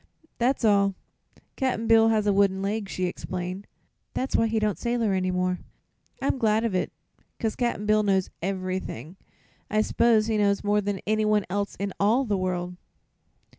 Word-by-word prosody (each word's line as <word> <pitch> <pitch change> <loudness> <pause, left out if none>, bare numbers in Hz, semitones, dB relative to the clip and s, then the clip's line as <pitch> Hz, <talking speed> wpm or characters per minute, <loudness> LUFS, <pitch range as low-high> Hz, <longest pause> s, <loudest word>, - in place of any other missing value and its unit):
"That's 250 0 +1
all. 200 -2 +3 0.6
Cap'n 255 -4 -1
Bill 225 0 +6
has 220 -2 +2
one 205 - +3
wooden 195 -1 +3
leg," 205 0 -2
she 185 - -2
explained. 180 +2 -5 0.5
"That's 260 - -2
why 225 - +3
he 225 0 -1
don't 215 -2 0
sailor 235 -4 0
any 185 -1 0
more. 180 0 0 0.6
I'm 270 0 0
glad 220 -1 +2
of 230 -4 -1
it, 185 - -1 0.5
'cause 220 -2 -1
Cap'n 235 -4 -1
Bill 215 0 +4
knows 195 -3 +1
ev'rything. 185 -5 -4 0.5
I 215 0 +2
s'pose 220 0 +3
he 220 -1 0
knows 200 -1 +2
more 205 0 +2
than 200 -1 -3
anyone 215 -1 +2
else 200 +1 -2
in 200 0 -4
all 225 +7 +3
the 210 -4 0
world." 180 -1 -2
205 Hz, 170 wpm, -26 LUFS, 190-220 Hz, 0.6 s, Bill